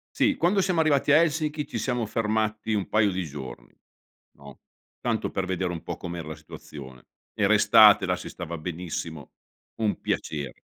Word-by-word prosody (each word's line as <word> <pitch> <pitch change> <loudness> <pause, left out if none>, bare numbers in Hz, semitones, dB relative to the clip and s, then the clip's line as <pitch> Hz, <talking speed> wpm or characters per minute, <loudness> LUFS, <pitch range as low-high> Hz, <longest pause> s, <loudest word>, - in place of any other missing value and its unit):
Sì, 290 0 +3
quando 190 +4 +2
siamo 185 -3 +1
arrivati 150 -2 +3
a 150 - +8
Helsinki 155 -2 -1
ci - - -4
siamo 125 -3 -1
fermati 110 0 -1
un 100 -2 -1
paio 105 -2 +2
di 95 0 -2
giorni, 70 -5 -9 0.6
no. 70 -2 -14 0.4
Tanto - - -1
per 95 - -2
vedere 95 -1 -1
un 85 - -6
po' - - -4
com'era 85 -3 -6
la 80 - -6
situazione. 65 -4 -12 0.3
Era - - +2
estate, - - +7
là - - 0
si - - -8
stava 85 -1 -6
benissimo, 80 -2 -6 0.5
un 110 -2 -1
piacere. 70 -5 -3
95 Hz, 170 wpm, -26 LUFS, 80-130 Hz, 0.6 s, a